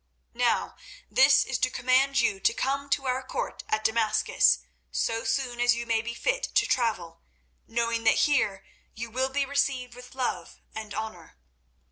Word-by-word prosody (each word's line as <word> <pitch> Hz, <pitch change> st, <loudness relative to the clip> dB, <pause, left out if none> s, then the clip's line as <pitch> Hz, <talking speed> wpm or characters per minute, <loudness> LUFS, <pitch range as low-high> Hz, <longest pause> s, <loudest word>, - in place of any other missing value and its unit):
Now 240 Hz, 0 st, 0 dB, 0.3 s
this 270 Hz, +1 st, +6 dB
is 265 Hz, -, -2 dB
to 255 Hz, -, +2 dB
command 260 Hz, +2 st, +2 dB
you 205 Hz, -4 st, +1 dB
to -, -, +2 dB
come 280 Hz, +1 st, -2 dB
to 275 Hz, -1 st, 0 dB
our 255 Hz, 0 st, 0 dB
court 260 Hz, -, -5 dB
at 215 Hz, 0 st, 0 dB
Damascus 220 Hz, -, +3 dB, 0.3 s
so 225 Hz, -, -1 dB
soon 240 Hz, +1 st, -1 dB
as 240 Hz, 0 st, +4 dB
you 235 Hz, 0 st, -4 dB
may 225 Hz, -1 st, +1 dB
be 235 Hz, +1 st, -6 dB
fit -, -, 0 dB
to -, -, +4 dB
travel, 215 Hz, -9 st, -1 dB, 0.5 s
knowing 230 Hz, 0 st, -1 dB
that -, -, +5 dB
here 205 Hz, -10 st, 0 dB, 0.3 s
you 230 Hz, +1 st, -6 dB
will 260 Hz, +3 st, 0 dB
be 280 Hz, +1 st, 0 dB
received 270 Hz, -3 st, -1 dB
with 250 Hz, +1 st, -13 dB
love 205 Hz, -10 st, -3 dB
and 215 Hz, -1 st, -7 dB
honour. 220 Hz, -, -7 dB
240 Hz, 165 wpm, -27 LUFS, 225-265 Hz, 0.5 s, this